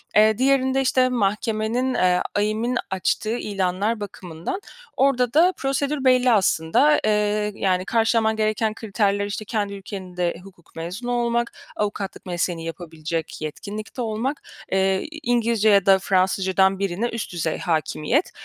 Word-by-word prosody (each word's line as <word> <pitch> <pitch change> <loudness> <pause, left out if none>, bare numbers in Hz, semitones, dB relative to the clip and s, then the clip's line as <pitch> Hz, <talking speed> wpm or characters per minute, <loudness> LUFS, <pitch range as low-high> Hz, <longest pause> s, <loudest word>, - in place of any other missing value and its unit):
Eee, 215 0 +5
diğerinde, 265 0 +2
işte, 255 -1 +3
mahkemenin, 225 +2 0
eee, 180 -3 +2
AİM'in 215 +4 0
açtığı 215 +4 0
ilanlar 200 +1 -1
bakımından 185 - -6 0.4
orda 250 -3 +2
da 345 +5 +5
prosedür 275 +1 -1
belli 255 -1 +5
aslında. 210 - +3
Eee, 210 0 +1
yani 185 -2 0
karşılaman 225 0 +2
gereken 215 0 0
kriterler, 205 -2 0
işte, 205 +1 -5
kendi 205 -2 -2
ülkenin 190 -2 -8
de 175 -1 0
hukuk 190 -3 -18
mezunu 180 +9 -5
olmak, 235 -1 0 0.2
avukatlık 205 -1 -3
mesleğini 175 -2 -2
yapabilecek 165 -1 -5
yetkinlikte 210 - -6
olmak, 235 +5 -2 0.3
eee, 190 0 +2
i 315 - -8
İngilizce 235 -3 +2
ya 200 -2 +5
da 195 -1 +6
Fransızca'dan 190 0 +2
birine 200 +4 -1
üst 230 -5 -5
düzey 160 -2 -1
hâkimiyet. 165 - 0
210 Hz, 135 wpm, -23 LUFS, 190-240 Hz, 0.4 s, da